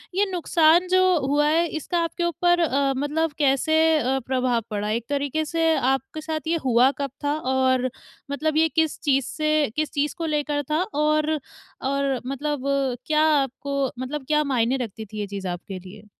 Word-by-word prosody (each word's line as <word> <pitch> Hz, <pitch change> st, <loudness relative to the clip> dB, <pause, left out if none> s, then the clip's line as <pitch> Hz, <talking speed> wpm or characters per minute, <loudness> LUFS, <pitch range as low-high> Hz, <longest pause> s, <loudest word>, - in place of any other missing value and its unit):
ये 405 Hz, -, +3 dB
नुकसान 345 Hz, 0 st, +3 dB
जो 370 Hz, +1 st, +3 dB, 0.2 s
हुआ 290 Hz, +2 st, +2 dB
है, 330 Hz, +3 st, +2 dB
इसका 320 Hz, +2 st, -2 dB
आपके 345 Hz, +1 st, -3 dB
ऊपर 350 Hz, +1 st, +2 dB
अ, 280 Hz, -4 st, +1 dB
मतलब 300 Hz, +3 st, 0 dB
कैसे 285 Hz, +2 st, +2 dB, 0.2 s
अ, 265 Hz, 0 st, 0 dB
प्रभाव 255 Hz, -2 st, +1 dB
पड़ा 210 Hz, -1 st, -3 dB
है? 215 Hz, -, 0 dB
एक 235 Hz, -, -4 dB
तरीके 285 Hz, +2 st, -1 dB
से 325 Hz, 0 st, +1 dB
आपके 270 Hz, +4 st, -1 dB
साथ 310 Hz, 0 st, -4 dB
ये 335 Hz, -, +1 dB
हुआ 245 Hz, +1 st, +5 dB
कब 275 Hz, -, -2 dB
था 290 Hz, -, +1 dB, 0.2 s
और 260 Hz, -1 st, +2 dB, 0.4 s
मतलब 310 Hz, +2 st, -1 dB
ये 320 Hz, 0 st, +4 dB
किस 320 Hz, -2 st, +1 dB
चीज़ 275 Hz, -3 st, +2 dB
से 305 Hz, -2 st, 0 dB
किस 310 Hz, 0 st, -1 dB
चीज़ 295 Hz, +4 st, -1 dB
को 330 Hz, -, -3 dB
लेकर 295 Hz, -1 st, -1 dB
था 310 Hz, +3 st, +2 dB
और 305 Hz, +1 st, +1 dB, 0.5 s
और 275 Hz, -1 st, 0 dB
मतलब 275 Hz, +1 st, -3 dB, 0.4 s
क्या 305 Hz, +1 st, +2 dB, 0.2 s
आपको 275 Hz, 0 st, -2 dB
मतलब 265 Hz, +2 st, -4 dB
क्या 300 Hz, 0 st, +2 dB
मायने 255 Hz, -2 st, +1 dB
रखती 225 Hz, -3 st, -5 dB
थी 215 Hz, +1 st, -8 dB
ये 205 Hz, -, -3 dB
चीज़ 195 Hz, -1 st, -5 dB
आपके 180 Hz, +2 st, -5 dB
लिए? 195 Hz, +3 st, -13 dB
285 Hz, 180 wpm, -24 LUFS, 260-315 Hz, 0.5 s, हुआ